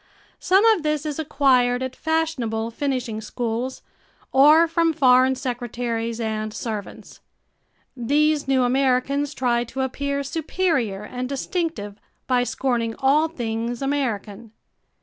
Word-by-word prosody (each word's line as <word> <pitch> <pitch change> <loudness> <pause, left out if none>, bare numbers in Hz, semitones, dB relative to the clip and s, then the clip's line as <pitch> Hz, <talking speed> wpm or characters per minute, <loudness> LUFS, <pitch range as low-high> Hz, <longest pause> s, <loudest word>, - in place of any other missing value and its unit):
Some 385 +4 +3
of 440 -6 +4
this 305 -1 -1
is 300 0 -3
acquired 260 -4 +2
at 260 0 -5
fashionable 255 -10 -1
finishing 250 -4 -2
schools 235 +3 -4 0.5
or 300 +5 +6
from 330 0 +1
foreign 260 -3 +4
secretaries 240 -3 -3
and 215 -1 -2
servants. 215 -2 -7 0.8
These 290 +4 +1
new 265 -1 +3
Americans 270 +3 +1
try 240 -2 +1
to 265 +3 -5
appear 280 +2 -2
superior 280 - -1
and 250 +3 -5
distinctive 275 - -3 0.3
by 250 -1 +2
scorning 240 -3 -1
all 285 +4 +3
things 235 -4 -4
American. 230 -6 -3
260 Hz, 115 wpm, -23 LUFS, 235-290 Hz, 0.8 s, or